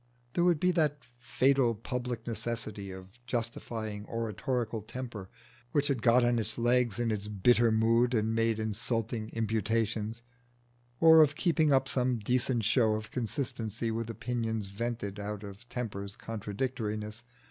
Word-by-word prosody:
There 175 - +2
would 175 -3 +4
be 180 +3 +3
the 155 -4 +2 0.3
fatal 130 -1 +2
public 120 +1 -4
necessity 110 -3 -4
of 95 +5 -11
justifying 110 -3 -3
oratorical 115 +1 -2
Temper 110 -3 -7 0.4
which 145 -1 +2
had 130 -5 0
got 120 +1 +5
on 120 -1 +2
its 110 0 -2
legs 120 -2 +2
in 120 -1 0
its 105 -1 -2
bitter 115 +3 +4
mood 115 +3 +3
and 110 0 +1
made 115 -1 +2
insulting 110 +1 -2
imputations, 110 0 -1 0.8
or 160 -1 +8
of 150 -2 +4
keeping 160 -3 +2
up 135 0 +4
some 125 -2 +1
decent 120 +2 +1
show 110 -1 +3
of 110 0 -6
consistency 115 -3 -2
with 115 0 -3
opinions 115 -2 -2
vented 105 -1 -4
out 105 0 -5
of 100 +4 -10
Temper's 100 -5 -4
contradictoriness. 110 0 -4
115 Hz, 140 wpm, -30 LUFS, 110-125 Hz, 0.8 s, or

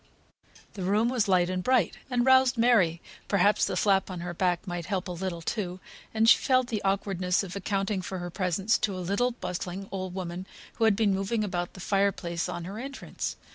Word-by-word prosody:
The 195 - -7
room 210 +5 +2
was 245 -5 +1
light 180 -2 +3
and 185 0 -2
bright, 250 -7 +2
and 245 -1 +1
roused 260 -1 +5
Mary 215 -9 +3 0.2
(perhaps 200 +1 +3
the - - -2
slap 195 -2 +2
on 180 -2 -5
her 175 0 -4
back 175 0 0
might 175 -3 -5
help 195 -2 -2
a - - -4
little, 175 -1 -4
too), 185 -2 -3 0.3
and 220 0 +2
she - - +8
felt 255 -2 +2
the 215 -3 -2
awkwardness 195 -1 0
of 190 -1 -7
accounting 195 0 -1
for 190 +1 -5
her 175 0 -5
presence 190 +4 +1
to 200 -3 -1
a 180 -2 -5
little 205 +6 +2
bustling 185 -2 -5
old 185 -1 -4
woman 185 0 -5 0.3
who 225 - +3
had 220 -2 +4
been 210 -2 +2
moving 195 +3 -1
about 175 -3 -3
the - - -10
fire 200 +1 +2
place 170 -1 -4
on 175 -1 -4
her 195 +5 -6
entrance. 275 +3 -5
195 Hz, 210 wpm, -28 LUFS, 180-215 Hz, 0.3 s, she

